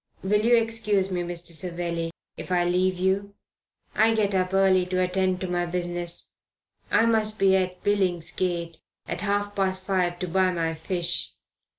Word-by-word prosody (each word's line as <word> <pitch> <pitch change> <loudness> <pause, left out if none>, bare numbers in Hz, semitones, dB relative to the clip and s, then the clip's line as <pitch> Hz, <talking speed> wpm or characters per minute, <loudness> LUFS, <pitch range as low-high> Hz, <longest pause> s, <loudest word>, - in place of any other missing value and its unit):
"Will 210 +2 +2
you 240 +1 +5
excuse 220 -4 +1
me, 180 -1 -1
Mr. 175 -1 -3
Savelli, 170 -1 -3 0.3
if - - -8
I 175 -1 +2
leave 180 +1 +1
you? 195 +2 0 0.6
I 225 +1 +3
get 205 -2 +1
up 185 -1 +1
early 190 -1 +4
to 185 0 -1
attend 185 0 +1
to 185 - -2
my 175 0 -1
business. 175 -1 -2 0.6
I 225 - +4
must 215 -2 +1
be 195 -2 +4
at 185 -1 -1
Billingsgate 175 -3 -1 0.3
at - - -3
half 205 0 -1
past 190 -1 -1
five 180 -3 0
to 180 - -4
buy 185 +2 +2
my 165 -2 -1
fish. 170 +2 -2
185 Hz, 165 wpm, -25 LUFS, 175-200 Hz, 0.6 s, you